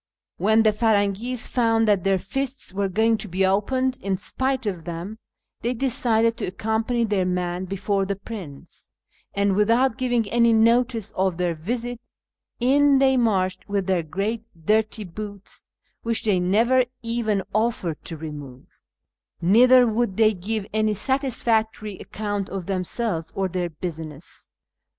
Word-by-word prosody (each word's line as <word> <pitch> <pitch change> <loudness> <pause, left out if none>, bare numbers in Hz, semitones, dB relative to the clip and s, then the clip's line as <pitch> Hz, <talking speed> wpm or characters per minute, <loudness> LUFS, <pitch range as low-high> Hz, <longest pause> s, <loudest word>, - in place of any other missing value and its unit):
When 220 +4 +3
the 215 - +5
Firangis 220 +2 +1
found 225 -2 +2
that 200 -4 +3
their 195 -1 +2
fists 270 +2 -4
were 200 0 -1
going 220 +4 +2
to 210 - -7
be 190 +1 +1
opened 255 +7 0
^ - - -28
in 195 -1 -1
spite 260 +4 -2
of 185 -5 -3
them, 175 +6 -6 0.4
they 240 +2 -1
decided 230 -3 +1
to - - -3
accompany 220 +5 -1
their 205 -4 +1
man 180 0 -2
before 195 +1 -1
the 200 - -1
prince, 195 -9 -10 0.4
and, 200 -1 +2
without 230 +4 +3
giving 245 -4 +1
any 235 -1 +4
notice 230 -1 +2
of 190 -2 0
their 180 -1 0
visit, 235 +8 -4 0.6
in 275 +3 +4
they 265 0 +4
marched 190 -6 0
with 200 -2 0
their 185 -2 +1
great 200 +8 -3 0.2
dirty 215 +1 +1
boots 200 +2 -8 0.3
(which 230 -1 0
they 205 -4 +2
never 230 +8 +3 0.2
even 230 -4 0
offered 215 -7 -1
to 165 - -5
remove); 145 -5 -10 0.6
neither 245 +8 +6
would 225 -3 0
they 220 -1 +5
give 205 +3 -3
any 215 -1 +1
satisfactory 220 -4 0
account 205 -2 -4
of 190 -1 -5
themselves 185 -2 -2
or 195 -1 0
their 180 -1 -2
business. 160 -1 -8
215 Hz, 145 wpm, -23 LUFS, 190-230 Hz, 0.6 s, neither